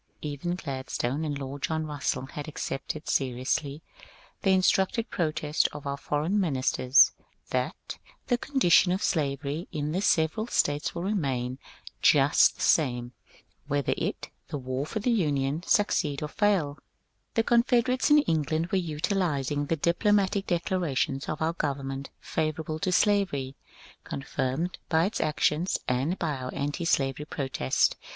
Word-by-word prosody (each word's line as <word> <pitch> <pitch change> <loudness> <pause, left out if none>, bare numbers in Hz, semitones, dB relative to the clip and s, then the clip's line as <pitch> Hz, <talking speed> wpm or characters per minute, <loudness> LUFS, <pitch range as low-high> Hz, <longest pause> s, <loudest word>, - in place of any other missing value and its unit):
Even 150 +4 -3
Gladstone 135 -2 -3
and 145 -2 -2
Lord 140 0 -6
John 160 +1 -1
Russell 145 -3 -2
had 145 +2 -7
accepted 150 0 -5
seriously 135 +3 -1 0.6
the 195 - +1
instructed 190 +4 +2
protests 155 -3 0
of 145 0 -8
our 140 0 -2
foreign 150 +8 -1
ministers 130 -5 +4 0.4
that - - -3 0.3
^^The 245 -1 +1
condition 195 -10 +4
of 185 +2 -1
slavery 145 +1 -1
in 150 -2 -2
the 185 +4 -1
several 165 +4 +2
States 145 -8 0
will 170 - -3
remain 135 -10 -1 0.4
just - - +5
the - - -5
same 125 -5 +2 0.6
whether 145 -1 +1
it - - -4 0.2
[the - - -4
war 130 +2 -3
for 220 - -4
the 220 +4 +1
Union] 145 -7 +1
succeed 155 -8 +2
or 150 - -3
faiL" 175 -8 +1 0.6
The 225 - +3
Confederates 240 +3 +3
in 295 0 +6
England 160 - 0
were 195 - +3
utilizing 150 -4 -1
the 165 - +1
diplomatic 195 +4 +1
declarations 170 -6 -1
of 155 - -2
our 165 +1 +1
government 140 -3 -3
favourable 155 0 -2
to 185 +2 0
slavery, 180 -10 +1 0.5
con 135 - -6
firmed 135 +7 -2
by 160 0 +3
its 210 - -2
actions 155 +3 +1
and 135 +9 0
by 155 -5 -2
our 130 0 -5
antislavery 145 -2 0
protests. 130 - 0
155 Hz, 140 wpm, -27 LUFS, 140-180 Hz, 0.6 s, in